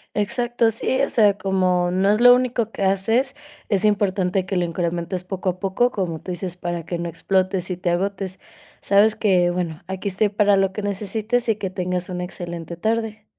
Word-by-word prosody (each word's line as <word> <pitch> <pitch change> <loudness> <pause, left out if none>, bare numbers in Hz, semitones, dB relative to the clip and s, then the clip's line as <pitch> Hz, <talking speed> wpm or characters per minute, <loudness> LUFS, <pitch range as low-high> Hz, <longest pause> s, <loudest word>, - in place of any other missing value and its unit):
Exacto, 235 +2 +1
sí, 255 +4 -1
o 275 - +1
sea, 205 -3 +3
como 185 -2 +1
no 190 +3 +2
es 215 +2 +1
lo 245 0 +9
único 245 -3 0
que 200 - -4
haces, 225 +8 +1 0.3
es 200 -1 +1
importante 195 -3 +1
que 190 0 -2
lo 180 - +2
incrementes 170 +1 -2
poco 185 0 -3
a 180 0 -4
poco, 195 +6 +1
como 180 -8 -3
tú - - -10
dices, 180 0 -4
para 175 -2 -4
que 170 0 -4
no 170 0 -3
explotes 185 +2 -1
y 180 - -3
te 180 0 -1
agotes. 190 +1 -2 0.4
Sabes 205 +2 +4
que, 185 -4 +3
bueno, 175 -3 -3
aquí 190 +2 -3
estoy 200 +2 +1
para 205 0 +3
lo 195 -1 +2
que 210 +2 -5
necesites 215 +4 -1
y 220 - +3
que 200 -3 -4
tengas 180 -1 -3
una 180 -1 -3
excelente 175 -2 -7
tarde. 220 +1 -2
190 Hz, 195 wpm, -22 LUFS, 180-215 Hz, 0.4 s, lo